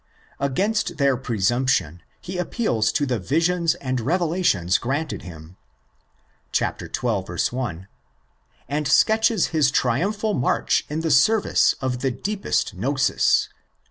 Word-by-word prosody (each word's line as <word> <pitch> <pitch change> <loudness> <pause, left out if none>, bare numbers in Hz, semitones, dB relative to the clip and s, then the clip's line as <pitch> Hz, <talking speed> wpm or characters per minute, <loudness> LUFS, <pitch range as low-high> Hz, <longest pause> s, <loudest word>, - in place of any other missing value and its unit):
Against 190 +11 -1
their 140 -2 +3
presumption 115 - 0 0.2
he 180 +9 -6
appeals 120 - 0
to 145 - 0
the 125 -4 -1
visions 165 - +1
and 130 -6 -3
revelations 165 - +1
granted 140 +4 -3
him 85 0 -12 1.0
(xii. - - +3 0.4
1), 110 -3 -2 0.8
and 150 +1 -2
sketches 220 - +3
his 155 -5 +2
triumphal 195 - 0
march 125 - 0
in 155 +2 -2
the 160 -1 -1
service 210 +10 +3
of 130 -2 -2
the 135 - 0
deepest 195 - -2
gnosis 135 +8 +1
(ii. - - -34
135 Hz, 115 wpm, -23 LUFS, 115-175 Hz, 1.0 s, their